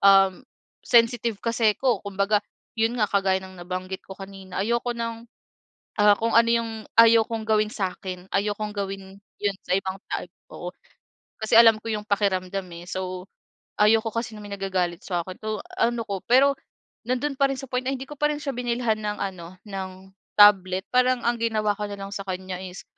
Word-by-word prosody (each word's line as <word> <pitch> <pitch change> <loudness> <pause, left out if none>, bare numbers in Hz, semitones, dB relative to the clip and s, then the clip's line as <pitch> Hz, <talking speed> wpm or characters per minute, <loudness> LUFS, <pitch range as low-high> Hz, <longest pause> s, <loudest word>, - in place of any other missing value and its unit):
um, 195 -2 +6 0.5
sensitive 230 -2 +3
kasi 230 -2 +2
ako. 260 -3 +2
Kumbaga 200 +1 +1 0.4
yun 225 +2 +1
nga, 215 - +3
kagaya 195 -1 +2
ng 185 -1 -11
nabanggit 185 +1 -5
ko 190 - -8
kanina, 195 -1 -6
ayoko 235 +1 0
ng, 230 0 -4 0.7
ah, 205 0 +7
kung 230 +2 -1
ano 230 0 +5
yung 230 -1 +1 0.2
ayokong 230 -1 +5
gawin 215 -1 +2
sa'kin, 185 -2 -5
ayokong 210 +1 -1
gawin 195 -1 -5 0.2
yun 200 -1 0
sa - - -1
ibang 190 0 -3
tao - - -2 0.3
oo. 175 - -6 0.7
Kasi 220 - +1
alam 225 -2 +8
ko 225 - -4
yung 210 -1 -3
pakiramdam, 195 -2 0
eh. 170 +1 -10
So, 185 0 -4 0.6
ayaw 215 +2 +6
ko 225 - -2
kasi 230 -1 -3
na 210 - -10
may 205 - -8
nagagalit 185 -3 -2
sa 175 -3 -2
akin. 185 -1 -7
So, 215 0 -2 0.2
ano 235 0 +2
'ko. 195 -2 -4
Pero 275 +3 +5 0.5
nandun 255 +4 -1
pa 275 - +4
rin 270 - -3
sa 270 - -6
point 250 0 0
na 265 - +1
hindi 265 0 -6
ko 295 - -7
pa 295 +1 +2
rin 295 - -4
siya 275 - -2
binilhan 240 -2 0
ng 210 0 -3
ano, 185 -2 -6
ng 195 -2 -5 0.5
tablet. 190 -2 +6
Parang 250 0 +4
ang 240 0 +2
ginawa 215 -2 +1
ko 210 - -3
nalang 200 -1 -7
sa 200 - -4
kanya 185 0 -4
is 185 0 -8
210 Hz, 185 wpm, -25 LUFS, 190-230 Hz, 0.7 s, alam